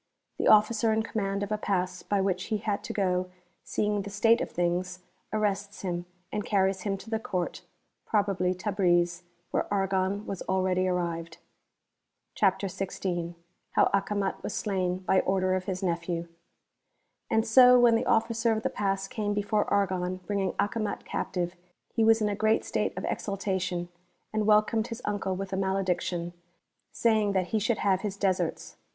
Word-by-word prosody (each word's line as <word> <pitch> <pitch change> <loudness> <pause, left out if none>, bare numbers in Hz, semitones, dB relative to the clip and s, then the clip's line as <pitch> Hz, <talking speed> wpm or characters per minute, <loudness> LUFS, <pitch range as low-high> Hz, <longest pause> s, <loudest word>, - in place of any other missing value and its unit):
The - - +1
Officer 215 +1 +5
in 220 0 +1
command 200 -3 -2
of 205 - -5
a 215 - 0
Pass 185 -3 -1
by 200 -1 0
which 190 -1 0
he 220 - -1
had 205 -1 -2
to - - -4
go, 185 -2 0 0.3
seeing 210 -1 0
the 200 - -6
state 225 +3 +3
of - - -2
things, 180 +1 -1 0.3
arrests 205 -1 -1
him 175 -1 -3 0.2
and 210 -1 -2
carries 190 -2 +1
him 195 -2 -1
to 210 - -12
the 220 - +1
Court 180 -5 -3 0.5
(probably 195 -4 +1
Tabriz), 175 -3 +1 0.3
where - - -1
Argon 195 0 0
was 195 - -5
already 185 -1 +1
arrived.) 170 -2 -2 1.0
CHAPTER 195 -1 +2
XVI. 180 -2 -3 0.4
How - - +4
Acomat 200 0 0
was - - -4
slain 185 -3 -1
uv 190 0 +3
order 185 0 +2
of 185 -1 -1
his 185 0 -3
Nephew. 170 -1 -2 1.0
yVxD 220 0 +3
so 250 +2 +7
when 240 -1 +6
the 225 - +1
Officer 230 0 +2
of 220 0 -1
the - - 0
Pass 195 -1 -1
came 205 0 -2
before 205 +1 +1
Argon 185 -2 +1
bringing 195 -2 -1
Acomat 210 +1 -2
captive, 175 0 -3 0.4
he 225 - +2
was 225 0 +5
in - - +2
a 205 - 0
great 215 +2 +2
state - - -1
of - - -3
exulta 195 -2 -2
tion, 175 -1 -2 0.5
and 215 -1 0
welcomed 215 +1 +3
his 230 +1 -7
uncle 200 -2 -1
with 195 +1 -5
a - - 0
malediction,* 180 -3 -1 0.6
saying 215 -3 +2
that 185 -2 0
he 220 - +1
should 225 +2 +1
have 190 -2 +1
his 200 -2 -4
deserts. 185 -4 -1
195 Hz, 170 wpm, -28 LUFS, 185-210 Hz, 1.0 s, so